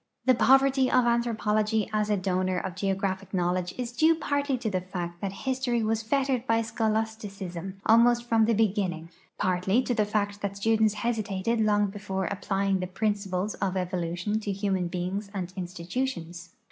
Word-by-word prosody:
The 260 - +6
poverty 270 +1 +4
of 250 - +4
anthropology 220 -2 +1
as 210 0 +1
a 210 - +2
donor 185 -1 0
of 185 0 -3
geogra])hic 195 +1 -2
knowledge 180 0 0
is 245 -2 -3
due 315 +6 +4
partly 285 -3 -1
to 240 - -4
the 185 -3 0
fact 175 -2 -6
that 195 - -2
history 255 -3 0
was 220 0 0
fettered 260 +1 0
by 230 0 +2
scholasticism 210 -5 -3
almost 235 +2 +5
from 225 -2 +4
the 230 0 +2
beginning, 185 -6 0 0.3
partly 185 +6 +1
to 250 - 0
the 215 -3 +2
fact 205 -1 -1
that 200 0 -3
students 220 0 +2
hesitated 220 -1 -1
long 205 -1 +3
before 195 -2 -3
applying 195 -1 0
thei)rin 185 +4 0
eiples 200 0 -3
of 190 -1 0
evolution 180 +3 -2
to 210 -2 -3
human 195 -2 -1
b('ings 185 +3 -3
and 185 -2 -4
institutions. 180 0 -4
205 Hz, 160 wpm, -27 LUFS, 185-230 Hz, 0.3 s, The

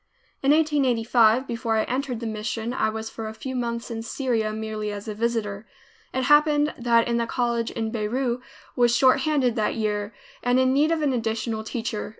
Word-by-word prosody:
In 275 - +1
1885, 255 -6 +3
before 230 -2 -1
I 220 - +2
entered 255 -2 -3
the - - -4
mission, 220 +2 -3
I 220 - +1
was 220 +1 -5
for 225 -1 -6
a 220 - -7
few 260 +3 -6
months 235 -1 -3
in 225 -1 -4
Syria, 230 -2 -1
merely 215 -1 -4
as 205 +1 -7
a 215 - -3
visitor. 215 -2 -2 0.4
It 260 - -1
happened 295 +1 +4
that 235 -1 +3
the 235 -1 0
College 235 -1 0
in 225 -1 -3
Beirut 240 +3 -1 0.3
was 240 -1 +3
short 260 0 +5
handed 265 -4 +1
that 215 - 0
year, 210 -1 -1 0.3
and 245 +1 +2
in 260 0 +3
need 300 +4 +3
of 320 -2 0
an 280 -3 +2
additional 225 -1 -2
teacher. 225 -1 -4
235 Hz, 185 wpm, -24 LUFS, 220-260 Hz, 0.4 s, short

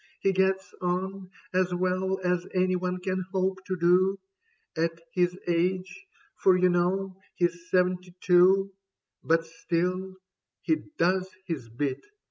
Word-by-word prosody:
He 195 - +2
gets 190 0 +1
on 185 +1 -2 0.2
As 180 -1 +1
well 185 +1 0
as 180 -1 0
anyone 185 0 0
can 185 0 -1
hope 190 0 -1
to 185 -1 -2
do 180 +3 +3 0.6
At 165 +1 -1
his 180 0 +1
age 185 - -1
— 330 0 -30
^for 185 -1 +5
you 185 0 +4
know 185 +2 0
he's 175 0 -1
seventy 180 0 +1
two; 190 +2 +4 0.5
But 165 0 +2
still, 180 +3 -2 0.5
he 320 - +2 0.2
does 185 +2 +2 0.2
his 140 -10 -5
bit. 130 +4 -3
185 Hz, 130 wpm, -27 LUFS, 175-190 Hz, 0.6 s, ^for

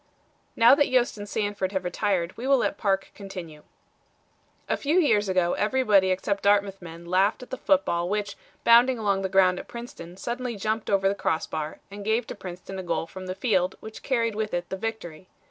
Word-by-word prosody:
Now 230 +2 +7
that 285 0 +3
Yost 245 -4 +1
and 205 0 -7
Sanford 205 -3 -2
have 190 -1 -1
retired 180 -1 -1
we 250 - -5
will 275 0 +5
let - - 0
Parke 195 -2 -1
continue. 180 -6 -9 1.1
"A - - +1
few 300 +5 0
years 210 - +2
ago 180 -2 +2
everybody 210 -4 +3
except 195 +2 -1
Dartmouth 200 -1 +2
men 170 0 -10
laughed 190 +7 +1
at - - -14
the - - -2
football 175 -12 +1
which, 210 0 -2 0.3
bounding 240 +2 +6
along 200 -3 0
the 190 - -2
ground 185 -1 +4
at - - -9
Princeton 185 -7 -9
suddenly 240 +3 -4
jumped 215 +2 -2
over 195 -1 +3
the 195 - +2
cross 160 -5 -1
bar 155 -1 -5
and 200 0 -8
gave 220 +3 +1
to - - -6
Princeton 185 +1 -8
a - - -5
goal 165 -2 -1
from 185 +2 -9
the 185 - -4
field 190 -6 +1
which 220 0 -10
carried 230 -4 0
with 215 -2 -2
it 175 0 -4
the - - -3
victory. 190 -5 -6
200 Hz, 200 wpm, -26 LUFS, 185-225 Hz, 1.1 s, Now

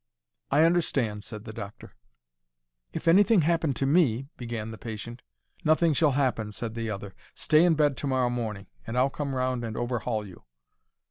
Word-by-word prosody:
"I 145 +3 +4
understand," 135 -11 +1
said 105 -1 -8
the 110 - -7
doctor. 100 -1 -9 1.0
"If 165 - -6
anything 200 +3 +6
happened 160 -3 +1
to 135 - -1
me—" 135 -4 +2
began 115 -3 -5
the 110 - -9
patient. 115 +1 -7 0.4
"Nothing 155 +1 +3
shall 145 0 +3
happen," 125 -6 0
said 115 +1 -4
the 115 -1 -3
other. 100 -2 -6 0.2
"Stay 155 +2 +4
in 175 -2 +4
bed 145 -2 +2
to 145 - -3
morrow 130 -2 +1
morning, 110 -5 -4 0.2
and 115 +2 -3
I'll 130 +2 +3
come 140 -2 -3
round 130 -1 -1
and 115 -1 -5
overhaul 120 -3 -2
you." 95 -3 -13
125 Hz, 175 wpm, -27 LUFS, 110-150 Hz, 1.0 s, anything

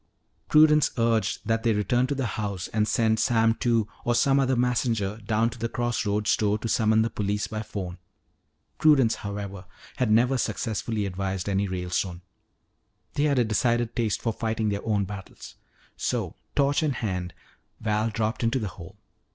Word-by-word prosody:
Prudence 150 -1 +6
urged 115 -3 +1
that 115 0 +1
they 115 -1 +2
return 120 +5 +1
to 140 - -1
the 135 -1 -1
house 100 -4 -3
and 105 -1 0
send 110 -1 +2
Sam 115 -1 +3
Two 115 -2 +1 0.2
or 120 - +1
some 135 +3 +4
other 130 -1 +2
messenger 120 -4 0
down 110 +1 0
to 120 - -11
the 115 +1 -2
cross 120 -2 -1
roads 105 +1 +1
store 105 -1 +2
to 110 - -5
summon 110 0 +3
the 115 - -2
police 105 0 -1
by 110 0 -4
phone. 95 -4 -6 0.8
Prudence 135 -7 +5
however 100 -2 -6 0.3
had 125 - +1
never 125 +4 +3
successfully 110 -2 -2
advised 95 0 -3
any 100 0 +1
Ralestone. 90 -1 -3 0.9
They 145 0 +1
had 140 -2 +2
a 125 - +4
decided 120 +2 +1
taste 115 -4 -1
for 115 - 0
fighting 110 -1 -1
their 100 0 -3
own 105 -3 +1
battles. 95 -1 -9 0.4
So, - - -2 0.2
torch 140 +1 +2
in 150 -3 +1
hand, 90 -7 -3 0.4
Val 110 0 0
dropped 110 +2 -2
into 115 +3 +2
the 110 -6 -2
hole. 85 0 -12
110 Hz, 170 wpm, -26 LUFS, 100-120 Hz, 0.9 s, Prudence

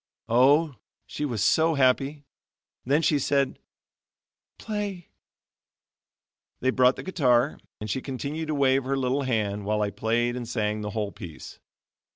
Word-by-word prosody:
Oh! 140 +4 +4 0.3
she 150 - -4
was 115 -7 -1
so 160 +7 +3
happy. 140 +2 +1 0.6
Then 145 +5 +2
she 150 -2 +3
said: 140 0 0 1.0
"Play." 205 -5 -5 1.5
They 130 - +1
brought 130 0 +4
the - - -8
guitar, 135 -7 +2 0.2
and 105 - -5
she 120 +5 -2
continued 140 +5 -4
to 155 - -1
wave 135 -1 +3
her 135 +1 -1
little 130 +1 0
hand, 105 -6 -1
while 105 +1 0
I 100 - -1
played 115 +4 0
and 120 -2 -5
sang 105 -2 -1
the 105 - -4
whole 105 -1 -3
piece. 85 -7 -10
130 Hz, 145 wpm, -26 LUFS, 110-145 Hz, 1.5 s, Oh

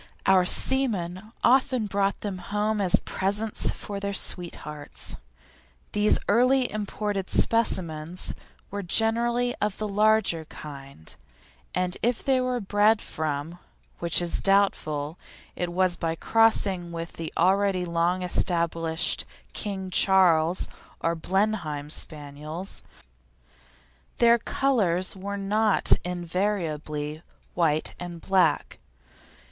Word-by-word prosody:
Our 190 -2 +5
seamen 215 -5 0
often 260 -2 +3
brought 200 0 -1
them 200 -3 -4
home 210 +3 -1
as 185 -3 +5
presents 205 +3 0
for 200 -1 -5
their 200 0 -3
sweethearts. 150 -6 -3 0.8
These 210 0 +3
early 250 +4 +3
imported 205 -2 -3
specimens 175 -7 0 0.4
were 200 0 -3
generally 235 +5 +2
of 210 -1 0
the 215 - -2
larger 210 -5 +2
kind, 140 - -10 0.6
and 180 0 -1
if 240 0 0
they 265 -2 +2
were 255 -1 -1
bred 205 +1 +3
from 155 +2 -4 0.4
which 170 +1 +1
is 170 - -1
doubtful 165 -6 +1 0.4
it 175 -1 -3
was 180 0 +1
by 165 -1 -2
crossing 195 -4 +2
with 165 0 -6
the 165 -1 -6
already 190 +1 +2
long 170 +2 0
established 165 -2 +1 0.3
King 190 -3 -3
Charles 180 -3 +4 0.3
or 165 - 0
Blenheim 170 -5 -1
Spaniels. 155 +4 -5 1.4
Their 235 0 +5
colours 200 -10 0
were 200 +1 -5
not 210 +2 +1
invariably 165 -4 -3 0.3
white 155 -3 +1
and 175 -1 -7
black. 190 +2 +1
190 Hz, 105 wpm, -26 LUFS, 165-210 Hz, 1.4 s, Our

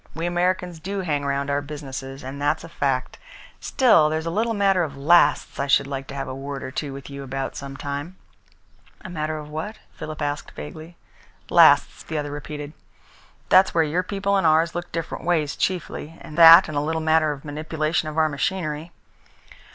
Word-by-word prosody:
We 165 +1 -3
Americans 175 0 -1
do 195 +4 -4
hang 150 -5 -1
round 140 0 -1
our 140 0 0
businesses, 135 -2 -7
and 135 +2 -7
that's 145 +2 0
a 165 - -10
fact. 135 -5 -2 0.4
Still, 220 - +4
there's 160 +1 -2
a 165 - -2
little 225 +5 0
matter 195 -2 +3
of 145 -4 -4
lasts 150 +1 +3
I 140 - -1
should 140 - +4
like 135 -1 -5
to 140 - -8
have 135 -1 -4
a 130 - -5
word 135 +1 -6
or - - -6
two 140 +1 -4
with 135 0 -9
you 140 0 -7
about 135 0 -4
some 140 -1 -7
time." 145 +7 -5 0.8
"A - - -20
little 190 - -8
matter 155 -1 -2
of 150 -1 -8
what?" 160 +9 -5 0.2
Philip 155 -1 -7
asked 145 -1 -3
vaguely. 160 +3 -9 0.5
"Lasts," - - +5
the 160 - -5
other 145 -1 -3
repeated. 145 0 -7 0.8
"That's 190 -1 +5
where 165 - +4
your 160 +4 0
people 200 +1 -1
and 190 - +2
ours 160 +2 +3
look 175 0 -5
different 165 -1 -5
ways 160 -4 0
chiefly, 165 -3 -3
that 165 +3 +8
and 155 - -6
a 145 - +1
little 160 +2 -1
matter 160 -1 +2
of 140 -1 -8
manipulation 155 +1 -2
of 155 - -8
our 160 -1 +4
machinery." 155 +1 -3
155 Hz, 195 wpm, -23 LUFS, 145-170 Hz, 0.8 s, that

